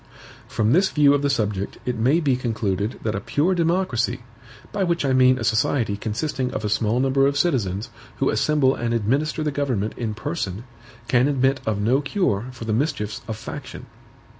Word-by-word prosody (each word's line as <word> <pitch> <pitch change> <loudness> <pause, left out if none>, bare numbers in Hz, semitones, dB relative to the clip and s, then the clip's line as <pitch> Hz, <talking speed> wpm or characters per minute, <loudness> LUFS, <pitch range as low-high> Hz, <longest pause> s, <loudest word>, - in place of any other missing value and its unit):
From 110 -1 0
this 190 +6 +4
view 145 -2 +4
of 145 - +1
the 145 - +1
subject 105 -7 -1
it 125 - -1
may 130 +9 +3
be 140 -6 +2
concluded 110 -3 -2
that 110 - -1
a 100 - -2
pure 155 - +1
democracy, 170 -9 0 0.5
by 200 -2 -1
which 170 -4 0
I 135 - +2
mean 130 0 +5
a 120 - -4
society 110 -1 +1
consisting 125 +5 -2
of 110 - -3
a - - 0
small 110 +3 +1
number 135 +1 +3
of 140 0 0
citizens, 110 - 0 0.3
who - - +1
assemble 145 -3 +2
and 120 -2 -2
administer 140 +8 0
the 150 - 0
government 130 -8 -1
in 110 -3 -3
person, 110 - -4 0.4
can 125 +1 +3
admit 135 -1 +1
of 105 -2 0
no 120 +7 +2
cure 140 - 0
for 125 -2 -8
the 110 - -1
mischiefs 110 -5 -1
of 110 - -4
faction. 115 - -8
125 Hz, 190 wpm, -23 LUFS, 110-145 Hz, 0.5 s, mean